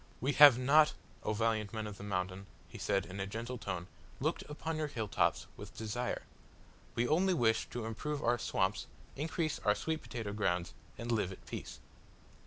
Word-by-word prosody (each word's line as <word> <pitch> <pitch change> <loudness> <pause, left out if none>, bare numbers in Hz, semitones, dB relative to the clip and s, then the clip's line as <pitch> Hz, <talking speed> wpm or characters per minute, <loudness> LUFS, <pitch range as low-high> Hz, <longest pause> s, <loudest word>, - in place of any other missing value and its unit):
"We 135 +4 +1
have 145 -4 +9
not, 150 +4 +5 0.3
O - - -1
valiant 110 -1 0
men 110 -1 -3
of 105 -1 -7
the - - -7
Mountain," 95 0 -3 0.2
he - - -10
said, 95 - +1
in 95 +2 -7
a 95 - -2
gentle 115 +4 -5
tone, 90 -5 -3 0.3
"looked - - 0
upon 160 +2 -3
your 155 -1 0
hill 115 -7 -3
tops - - +1
with - - -10
desire. 115 +3 -2 0.7
We 120 +1 +2
only 180 +5 +3
wish 115 -6 +2
to 120 -2 -4
improve 145 +7 -3
our 120 +1 +2
swamps, 95 0 0 0.3
increase 155 +1 -1
our 105 0 +3
sweet 160 -1 -2
potato 110 -4 -5
grounds, 90 -4 0 0.2
and 120 +1 -3
live 105 -5 +1
at 95 - -11
peace." - - -7
115 Hz, 185 wpm, -34 LUFS, 100-145 Hz, 0.7 s, have